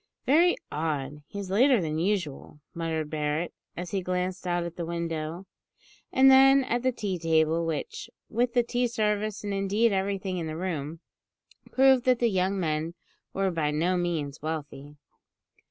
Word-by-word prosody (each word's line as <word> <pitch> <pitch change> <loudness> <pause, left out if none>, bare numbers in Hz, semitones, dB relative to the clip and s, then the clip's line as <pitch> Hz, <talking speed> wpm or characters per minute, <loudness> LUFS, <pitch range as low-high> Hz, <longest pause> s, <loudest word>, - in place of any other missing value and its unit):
"Very 335 +6 +5 0.2
odd; 150 -2 -3
he's 200 -2 -6
later 250 +4 +5
than 155 -3 -2
usual," 170 -6 -2
muttered 160 -2 -3
Barret, 155 +2 -2 0.2
as 175 0 -5
he 195 - -1
glanced 180 +1 -3
out 175 0 0
at 170 0 -6
the 175 - -4
window, 165 +1 -4 0.7
and 265 +1 +6
then 270 +1 +7
at 245 -1 -1
the 255 +1 +2
tea 200 -6 -3
table, 165 0 +2
which, 420 - -4 0.2
with 240 +1 0
the 245 - +4
tea 245 +1 0
service, 215 -2 -1
and, 205 -1 -3
indeed 200 +4 +2
everything 190 -1 -1
in 165 - -3
the 155 0 -5
room, 165 -3 -4 0.7
proved 265 -1 +4
that 255 -1 +4
the 235 -1 +2
young 190 +1 0
men 160 0 -2 0.4
were 195 -1 0
by 160 -3 0
no 165 +5 +1
means 165 -5 -2
wealthy. 150 -2 -6
180 Hz, 160 wpm, -27 LUFS, 160-215 Hz, 0.7 s, then